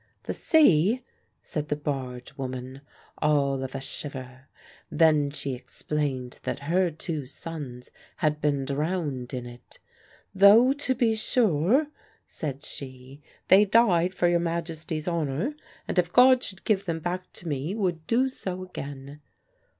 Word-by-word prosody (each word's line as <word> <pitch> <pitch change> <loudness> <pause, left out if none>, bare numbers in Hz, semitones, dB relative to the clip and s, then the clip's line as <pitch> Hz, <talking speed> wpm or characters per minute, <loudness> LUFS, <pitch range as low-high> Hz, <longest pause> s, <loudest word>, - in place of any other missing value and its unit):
"The - - -3
sea?" 235 - +4 0.4
said 150 -1 -4
the 150 - 0
barge 130 -4 -5
woman, 130 0 -6 0.4
all 140 -3 +2
of 130 +1 -6
a 135 - -3
shiver. 130 -1 -6 0.4
Then 155 -3 +4
she 140 -2 -4
explained 130 0 -4
that - - -4
her 175 +5 +2
two 155 -3 -4
sons 140 -4 -8 0.2
had 150 -2 0
been 140 -2 +1
drowned 145 -3 -2
in 125 -2 -4
it. 120 0 -13 0.6
"Though, 210 +7 +7
to 280 -2 -1
be 230 -2 +2
sure," 220 - +3 0.4
said 140 -1 -5
she, 130 +1 -9 0.3
"they 195 +3 +7
died 190 -5 +3
for 175 - +2
your 175 0 +3
Majesty's 165 -2 -3
honour, 170 - -1 0.3
and, - - +1
if 175 -1 0
God 255 +2 +6
should 190 -1 -8
give 200 -2 +1
them 165 -3 -2
back 180 +3 -4
to 175 - -10
me, 150 +5 -2
would 175 -7 -2
do 250 +3 +3
so 185 -8 -5
again." 140 -4 -8
155 Hz, 140 wpm, -26 LUFS, 135-185 Hz, 0.6 s, Though